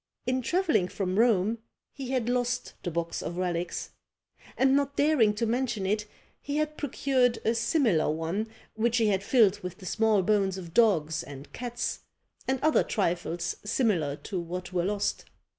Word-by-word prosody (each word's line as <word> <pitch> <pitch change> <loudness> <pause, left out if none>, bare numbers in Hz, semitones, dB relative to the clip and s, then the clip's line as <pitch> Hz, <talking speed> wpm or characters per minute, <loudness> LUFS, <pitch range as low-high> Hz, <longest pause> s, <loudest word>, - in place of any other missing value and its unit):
In 255 +1 0
travelling 320 - +2
from 185 +1 -2
Rome 225 -1 +3 0.3
he 270 -3 -7
had 255 -3 0
lost 245 0 -1
the - - -3
box 170 0 -3
of 170 - -5
relics; 175 -1 -2 0.7
and 265 +1 +4
not 280 0 +1
daring 285 -7 +4
to 230 - 0
mention 235 -3 -1
it, 210 +2 0 0.3
he 285 +1 -3
had 305 0 -1
procured 260 -4 +1
a 225 - +3
similar 230 - +2
one, 165 +8 -2 0.3
which 230 +2 +1
he 225 -3 +3
had 195 -1 +1
filled 205 -2 +4
with 180 -3 -7
the 185 - -12
small 215 +1 +2
bones 195 -1 +2
of 170 -3 -8
dogs 170 -9 +3
and 140 0 -10
cats, 240 -1 -3 0.5
and 265 0 +1
other 310 - +4
trifles 175 -3 -1
similar 200 - +1
to 185 +5 -5
what 180 +2 -6
were 175 -1 +1
lost. 205 +1 -1
215 Hz, 165 wpm, -28 LUFS, 180-245 Hz, 0.7 s, and